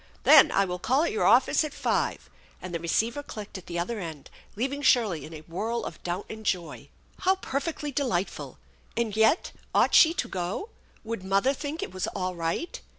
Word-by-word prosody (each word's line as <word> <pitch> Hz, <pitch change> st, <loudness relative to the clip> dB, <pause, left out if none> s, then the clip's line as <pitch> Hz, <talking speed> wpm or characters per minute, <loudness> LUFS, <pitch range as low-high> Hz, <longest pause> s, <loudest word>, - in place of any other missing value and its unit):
" -, -, -30 dB
Then -, -, +8 dB
I 195 Hz, -, +3 dB
will 180 Hz, -1 st, -4 dB
call 265 Hz, -, +2 dB
at 340 Hz, -, 0 dB
your 440 Hz, -, 0 dB
office -, -, +5 dB
at 305 Hz, -2 st, -5 dB
five," -, -, -1 dB, 0.3 s
and 185 Hz, -1 st, -8 dB
the 170 Hz, -, -1 dB
receiver 225 Hz, -, 0 dB
clicked 210 Hz, -8 st, -8 dB
at 180 Hz, -, -18 dB
the 175 Hz, -, -4 dB
other 210 Hz, +6 st, -2 dB
end, 160 Hz, -6 st, -8 dB, 0.2 s
leaving 270 Hz, +6 st, -2 dB
Shirley 215 Hz, -, +3 dB
in 155 Hz, -, -11 dB
a 155 Hz, -, -9 dB
whirl 215 Hz, +9 st, -3 dB
of -, -, -8 dB
doubt 180 Hz, +3 st, -3 dB
and 220 Hz, 0 st, -8 dB
joy. 180 Hz, -5 st, -3 dB, 0.3 s
How 380 Hz, +1 st, +3 dB
perfectly 295 Hz, -3 st, -3 dB
delightful! 245 Hz, -10 st, -2 dB, 0.4 s
And 225 Hz, -3 st, -1 dB
yet 220 Hz, +9 st, +3 dB, 0.2 s
ought -, -, +4 dB
she 325 Hz, +1 st, +7 dB
to -, -, -1 dB
go? 185 Hz, -, -4 dB, 0.3 s
Would 225 Hz, -3 st, -5 dB
mother 195 Hz, +8 st, +2 dB
think 295 Hz, +6 st, -5 dB
it -, -, -6 dB
was 185 Hz, -, -2 dB
all 185 Hz, -2 st, -2 dB
right? 170 Hz, -, -3 dB
220 Hz, 200 wpm, -27 LUFS, 180-280 Hz, 0.4 s, Then